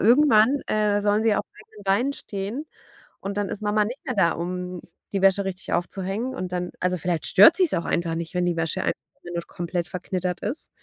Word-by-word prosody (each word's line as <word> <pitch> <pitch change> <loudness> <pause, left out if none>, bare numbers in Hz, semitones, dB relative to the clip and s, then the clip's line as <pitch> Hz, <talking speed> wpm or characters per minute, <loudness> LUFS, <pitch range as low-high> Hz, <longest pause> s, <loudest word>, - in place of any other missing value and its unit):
irgendwann, 250 +2 +5
äh, 210 -1 +2
sollen 205 +2 +2
sie 220 -2 +4
auf 205 - -1 0.2
eigenen 210 -1 -15
Beinen 230 +9 +2
stehen 215 +7 -5 0.5
und 200 +1 -5
dann 205 -1 0
ist 215 - -5
Mama 210 0 +2
nicht 245 +5 -6
mehr 255 - -2
da, 170 - +4
um 180 +1 -4 0.3
die 195 - 0
Wäsche 195 0 +4
richtig 190 -1 -5
aufzuhängen, 195 +8 -2
und 185 -7 -5
dann 180 0 -2
also, 180 0 0
vielleicht 170 -1 -1
stört 205 - +8
sie's 365 -6 +3
auch 170 - -2
einfach 170 -1 0
nicht, 170 +1 -5
wenn 180 0 +1
die 170 -1 0
Wäsche 165 +3 0
einfach - - +1 0.3
nur 175 -1 -4
komplett 175 -1 -3
verknittert 180 -1 -3
ist 240 +10 -4
195 Hz, 205 wpm, -24 LUFS, 180-215 Hz, 0.5 s, stört